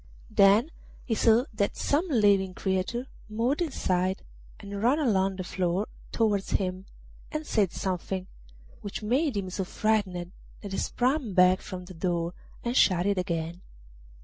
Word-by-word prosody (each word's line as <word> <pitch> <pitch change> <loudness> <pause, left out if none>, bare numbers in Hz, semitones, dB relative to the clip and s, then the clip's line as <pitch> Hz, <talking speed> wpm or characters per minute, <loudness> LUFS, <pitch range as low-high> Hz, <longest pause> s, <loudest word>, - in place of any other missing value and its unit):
Then 210 +8 +5 0.3
he 235 - -1
saw 225 +2 +4
that 200 -1 -1
some 310 +6 +1
living 200 - +3
creature 190 +6 -1 0.2
moved 235 +9 0
inside 185 - 0 0.4
and 200 -1 -6
ran 250 +6 +4
along 195 -10 +2
the 185 - -4
floor 180 +2 -1 0.3
towards 210 -4 +1
him 185 0 -1 0.4
and 305 0 -3
said 205 - +1
something, 185 0 -3 0.6
which 205 +1 -6
made 260 +3 +1
him 185 -2 -3
so 190 - -2
frightened 185 -3 -1 0.3
that 200 - -7
he 195 - -2
sprang 250 - 0
back 180 0 +5
from 180 -1 -7
the 185 - -10
door 170 0 -1 0.3
and 240 +1 -2
shut 180 -6 +4
it 200 -2 +1
again. 170 -1 -3
200 Hz, 150 wpm, -28 LUFS, 185-225 Hz, 0.6 s, Then